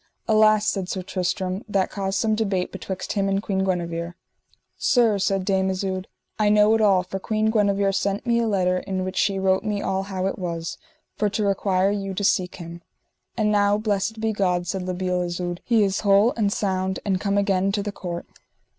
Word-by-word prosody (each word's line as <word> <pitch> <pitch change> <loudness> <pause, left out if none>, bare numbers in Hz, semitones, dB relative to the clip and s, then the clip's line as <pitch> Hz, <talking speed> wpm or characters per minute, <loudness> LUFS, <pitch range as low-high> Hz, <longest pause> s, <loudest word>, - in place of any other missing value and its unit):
Alas, 215 -1 +4
said 195 -4 -1
Sir 185 -1 -3
Tristram, 185 +1 -2
that 195 -2 0
caused 195 -1 -2
some 220 -1 +1
debate 200 -4 -1
betwixt 190 0 -5
him 195 -1 0
and 195 0 +1
Queen 195 -2 -1
Guenever. 170 -2 -2 0.6
Sir, 230 -5 +3
said 195 -1 0
Dame 190 -1 +1
Isoud, 190 0 -3 0.3
I 210 -1 +3
know 210 +1 +5
it 225 - +2
all, 195 -4 +4
for 195 +1 -5
Queen 215 +2 0
Guenever 200 -2 +2
sent 200 +2 -1
me 235 -1 +2
a 230 - +1
letter 185 -3 +1
in 190 0 -4
the 185 - -1
which 185 0 -4
she 195 0 +1
wrote 190 0 +1
me 210 -2 -1
all 190 -1 -1
how 190 -1 -4
it 195 - -2
was, 170 -2 -4 0.4
for 210 - +1
to 210 +1 -2
require 195 -1 +1
you 195 -2 -3
to 205 - -2
seek 185 -2 +1
him. 170 -1 -9 0.6
And 215 -2 +2
now, 205 0 +3
blessed 215 +1 -1
be 220 0 0
God, 180 -3 0
said 190 +2 -3
La 185 - -1
Beale 180 0 -1
Isoud, 175 0 -3
he 230 -3 +3
is 195 -1 0
whole 205 +3 +4
and 210 -3 +1
sound 190 -2 -1
and 190 -2 0
come 200 -1 0
again 195 -1 +2
to 205 0 -1
the 205 - -3
court. 175 -3 -6
195 Hz, 210 wpm, -23 LUFS, 185-205 Hz, 0.6 s, know